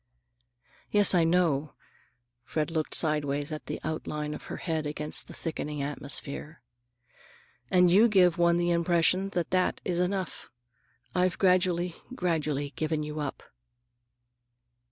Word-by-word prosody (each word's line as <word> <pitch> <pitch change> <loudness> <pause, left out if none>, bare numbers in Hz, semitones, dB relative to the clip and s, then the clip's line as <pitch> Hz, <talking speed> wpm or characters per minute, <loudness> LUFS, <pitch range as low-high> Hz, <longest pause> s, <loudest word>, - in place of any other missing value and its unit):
"Yes, 205 -2 +6
I 175 -2 +4
know." 165 -4 +1 0.7
Fred 155 +4 -2
looked 160 -2 -2
sidewise 145 -1 0
at 155 - -6
the 150 - -4
outline 150 -1 -3
of - - -9
her - - -6
head 160 -3 -2
against 150 +1 -2
the - - -10
thickening 150 -3 -4
atmosphere. 145 +2 -5 1.1
"And 180 -1 +5
you 210 +6 +6
give 180 -5 +4
one 170 0 +4
the 175 0 +1
impression 170 +3 +2
that 170 - -1
that 185 0 +1
is 175 -1 -1
enough. 185 +1 -2 0.6
I've 180 0 +1
gradually, 180 -2 +2 0.2
gradually 150 - -1
given 155 -1 -1
you 150 0 -5
up." 145 -2 -4
165 Hz, 130 wpm, -28 LUFS, 150-180 Hz, 1.1 s, Yes